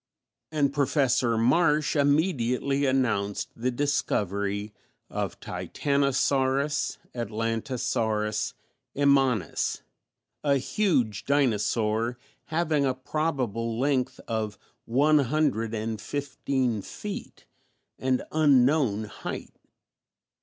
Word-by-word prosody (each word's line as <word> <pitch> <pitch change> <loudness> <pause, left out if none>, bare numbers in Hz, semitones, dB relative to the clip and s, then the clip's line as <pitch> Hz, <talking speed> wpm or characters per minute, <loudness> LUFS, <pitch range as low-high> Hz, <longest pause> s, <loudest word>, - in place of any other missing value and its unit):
And 145 -3 +1
Professor 135 -5 +2
Marsh 150 +6 +3
immediately 140 -2 +2
announced 110 -7 0
the 120 +2 -1
discovery 100 -6 -1 0.4
of - - -3
Titanosaurus 140 0 0 0.2
(Atlantosaurus) 115 -1 -1 0.4
immanis, 135 - +2 0.6
a 140 -2 +3
huge 130 - 0
dinosaur 115 -3 +1 0.3
having 155 -2 +1
a 130 -2 +1
probable 130 -6 -2
length 130 0 0
of 110 -3 -2 0.3
one 145 +6 +4
hundred 130 -5 0
and 110 -1 -3
fifteen 135 -5 -1
feet - - -7 0.5
and 130 -1 +1
unknown 135 -6 +3
height. 105 - -7
130 Hz, 80 wpm, -27 LUFS, 115-145 Hz, 0.6 s, one